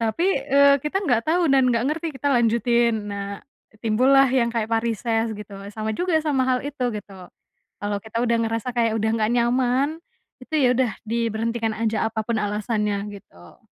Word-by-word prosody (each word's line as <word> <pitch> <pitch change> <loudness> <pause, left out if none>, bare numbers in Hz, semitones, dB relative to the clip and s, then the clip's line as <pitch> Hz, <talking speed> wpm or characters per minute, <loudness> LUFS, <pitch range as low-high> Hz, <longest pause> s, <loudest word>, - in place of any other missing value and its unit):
Tapi, 230 +11 0 0.2
eee, 280 +1 +6
kita 300 +8 -2
nggak 240 -7 +1
tahu 350 +3 +3
dan 270 -2 +4
nggak 230 +1 0
ngerti 315 +2 -2
kita 285 +2 -1
lanjutin 235 -2 +2
nah, 200 0 -5 0.4
timbullah 260 +5 +4
yang 250 -2 +2
kayak 225 -2 -1
varises 225 0 0
gitu 210 -1 -10 0.2
sama 220 +1 -3
juga 355 -2 +1
sama 280 -4 +1
hal 255 -1 +2
itu 280 -3 -4
gitu, 195 -4 -9 0.5
kalau 205 0 -2
kita 220 +1 -5
udah 235 -1 +2
ngerasa 225 +2 -2
kayak 230 -2 +2
udah 220 +1 0
nggak 215 -1 +1
nyaman, 255 +6 +1 0.4
itu 285 - -8
ya 260 - +4
udah 255 -2 +1 0.2
diberhentikan 230 0 -1
aja 220 -1 -1
apa 220 0 -4
pun 235 -2 0
alasannya 210 -1 -1
gitu. 85 - -16
230 Hz, 170 wpm, -23 LUFS, 215-255 Hz, 0.5 s, eee